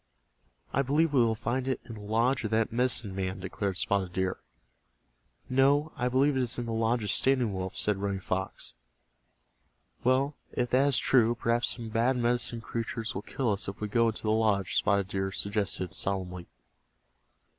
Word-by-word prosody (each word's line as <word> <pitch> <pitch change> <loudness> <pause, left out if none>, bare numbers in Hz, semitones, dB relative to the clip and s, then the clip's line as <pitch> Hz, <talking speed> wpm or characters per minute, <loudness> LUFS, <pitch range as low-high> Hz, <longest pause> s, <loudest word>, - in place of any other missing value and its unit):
"I 135 - +3
believe 145 +3 +2
we 130 -4 +5
will 115 -1 +1
find 125 +3 -2
it 130 - 0
in 115 - -8
the 105 - -9
lodge 115 +6 +1
of 110 - -1
that 110 0 +1
medicine 120 -4 0
man," 95 0 -3
declared 95 +1 -3
Spotted 95 -3 0
Deer. 95 0 -1 1.1
"No, 140 +4 +3
I 125 - 0
believe 135 +3 +3
it 130 - +2
is 120 -1 -2
in 120 - -3
the 115 - -3
lodge 115 +1 +1
of 105 - 0
Standing 125 -5 +2
Wolf," 95 0 -4
said 105 -1 +1
Running 100 -1 -2
Fox. 95 0 -3 1.3
"Well, 135 +3 +2 0.2
if 125 -1 -1
that 135 +3 +4
is 140 -4 +3
true 120 -2 +3
perhaps 115 +1 +1
some 115 -2 -7
bad 120 +4 +2
Medicine 120 -1 0
Creatures 115 0 -4
will 95 - -4
kill 120 +1 -1
us 100 - -2
if 100 - -6
we 105 - -2
go 115 +2 +3
into 110 - -3
the 110 - +1
lodge," 105 -4 +1
Spotted 100 -2 +2
Deer 95 0 -2
suggested, 100 -2 -2
solemnly. 90 -2 -2
115 Hz, 180 wpm, -29 LUFS, 100-125 Hz, 1.3 s, we